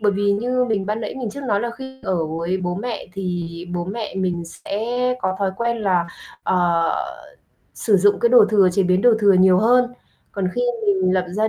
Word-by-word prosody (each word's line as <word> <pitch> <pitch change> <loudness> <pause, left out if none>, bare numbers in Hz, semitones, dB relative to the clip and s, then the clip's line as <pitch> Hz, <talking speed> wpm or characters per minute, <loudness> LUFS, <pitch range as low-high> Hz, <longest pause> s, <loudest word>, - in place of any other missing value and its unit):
Bởi 205 -2 +2
vì 200 +1 +1
như 250 +5 0
mình 210 -5 -1
ban 210 +2 -2
nãy 220 - -5
mình 250 -5 -4
trước 280 - -8
nói 205 -1 +1
là 235 +1 -2
khi 265 +2 -10
ở 180 -3 -1
với 165 +4 -2
bố 175 -1 -3
mẹ 225 +4 -5
thì 180 -2 -3 0.3
bố 175 0 -2
mẹ 215 +2 -5
mình 180 -3 -2
sẽ 200 +5 -5 0.4
có 185 0 -1
thói 195 -1 0
quen 235 0 -1
là, 185 -5 +1 0.4
ờ, 170 -2 +1 0.8
sử 210 -3 +2
dụng 205 +2 +3
cái 235 - +4
đồ 240 -3 +7
thừa, 200 -3 +4
chế 195 - +2
biến 185 +1 +2
đồ 245 - +6
thừa 205 -2 +5
nhiều 185 0 +5
hơn. 245 +3 +3 0.4
Còn 190 -2 -1
khi 245 - -1 0.3
mình 190 -2 +2
lập 185 -1 +1
gia 215 +4 0
200 Hz, 215 wpm, -21 LUFS, 185-225 Hz, 0.8 s, đồ